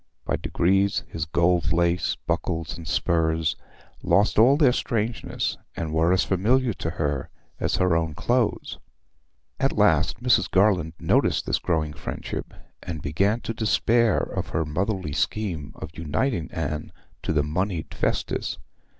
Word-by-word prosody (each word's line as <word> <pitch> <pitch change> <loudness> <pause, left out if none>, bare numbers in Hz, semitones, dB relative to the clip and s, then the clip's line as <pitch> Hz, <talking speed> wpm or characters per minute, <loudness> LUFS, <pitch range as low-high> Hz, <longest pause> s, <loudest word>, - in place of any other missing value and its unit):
By - - 0
degrees 95 +3 +1
his 80 -1 -4
gold 85 +1 +2
lace, 85 +1 +1
buckles, 80 +2 -2
and 85 -2 -9
spurs 80 -1 +1 0.5
lost 100 +1 +3
all 130 +5 +6
their 145 -5 +5
strangeness 115 -2 -2 0.2
and 80 -2 -3
were 80 +2 +3
as 95 - +3
familiar 115 +6 +2
to 80 - -4
her 75 -4 -1 0.3
as - - 0
her 90 -2 +2
own 80 -2 -1
clothes. 120 - 0 0.8
At - - 0
last 115 - +3
Mrs. 125 -8 +3
Garland 90 -5 +3
noticed - - +2
this - - 0
growing 80 -3 -1
friendship, - - -6 0.3
and 85 -4 -5
began 100 +10 +1
to 115 - -4
despair 115 0 +2
of - - -2
her 80 - -1
motherly 90 +1 -2
scheme 80 0 -2
of 80 0 -9
uniting 85 - -1
Anne 75 -1 -4 0.3
to - - -2
the 75 -2 +2
moneyed 85 +3 -2
Festus. - - -1
85 Hz, 140 wpm, -25 LUFS, 80-105 Hz, 0.8 s, all